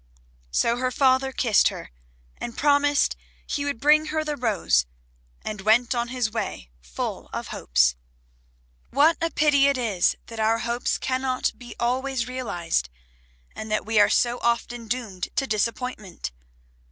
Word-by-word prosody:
So 235 - +1
her 255 +1 0
father 265 +1 +2
kissed 230 -5 +3
her, - - -5 0.5
and 235 - -6
promised 290 0 +3 0.3
he 285 -2 -2
would 285 -5 -2
bring 300 +3 +5
her 315 0 -1
the 300 -1 -3
rose, 200 - +1 0.6
and 210 -2 -5
went 230 +5 +3
on 240 -1 -1
his 245 -3 -1
way 205 - -4
full - - -5
of - - -5
hopes. 65 0 +2 0.9
What 300 +5 +4
a 330 - +1
pity 290 -3 +4
it 280 -1 +2
is 215 -8 +1
that 230 -1 -9
our 220 +1 +3
hopes 235 +1 -1
cannot 260 0 -1
be 245 -1 -11
always 255 +1 -1
realized, 175 - -2 0.7
and 215 - -6
that 215 - 0
we 220 0 +2
are - - +6
so 240 0 +2
often 235 0 -1
doomed 215 -6 -3
to 270 - +1
disappointment! 215 - -3
240 Hz, 150 wpm, -25 LUFS, 215-265 Hz, 0.9 s, are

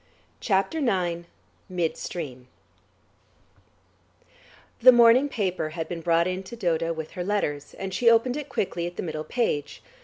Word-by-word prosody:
CHAPTER 200 +10 0
IX 175 - -1 0.4
MID 175 -3 -1
STREAM 130 -7 -6 2.3
The 255 +2 +10
morning 240 +3 +6
paper 185 - -2
had 160 -1 -3
been 170 -1 -5
brought 170 0 +2
in 185 +1 -2
to 195 +5 -10
Dodo 165 -6 0
with 160 -1 -5
her 180 0 -4
letters, 175 -8 -2
and 190 -1 -5
she 235 +3 +4
opened 230 +2 +3
it 295 -1 -5
quickly 175 -7 -2
at 175 - -8
the - - -3
middle 155 -3 -4
page. 150 - -2
180 Hz, 150 wpm, -26 LUFS, 165-230 Hz, 2.3 s, The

